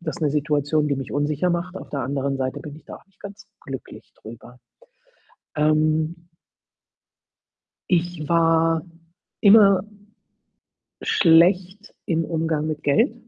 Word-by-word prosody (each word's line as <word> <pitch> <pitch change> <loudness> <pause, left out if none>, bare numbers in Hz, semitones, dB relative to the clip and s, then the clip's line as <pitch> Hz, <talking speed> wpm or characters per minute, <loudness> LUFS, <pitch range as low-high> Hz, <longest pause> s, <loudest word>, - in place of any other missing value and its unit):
das 170 - -6
'ne 150 - +1
Situation, 150 0 0
die 140 - -1
mich 135 -2 -6
unsicher 150 +4 0
macht, 175 +2 -3
auf - - -9
der 140 - -3
anderen 135 +1 -2
Seite 130 -1 -3
bin 150 -2 -9
ich 160 - -17
da - - -10
auch - - -21
nicht 195 -1 -37
ganz 205 +1 -11 0.2
glücklich 135 -1 -9
drüber. 120 +2 -13 1.0
Ähm 155 +2 0 1.6
Ich 175 -3 -1
war 165 -1 +2 0.6
immer 200 -2 +6 1.2
schlecht 185 +4 +2
im 165 -2 0
Umgang 160 -2 -2
mit 155 -1 -4
Geld. 220 - +2
160 Hz, 125 wpm, -22 LUFS, 145-175 Hz, 1.6 s, immer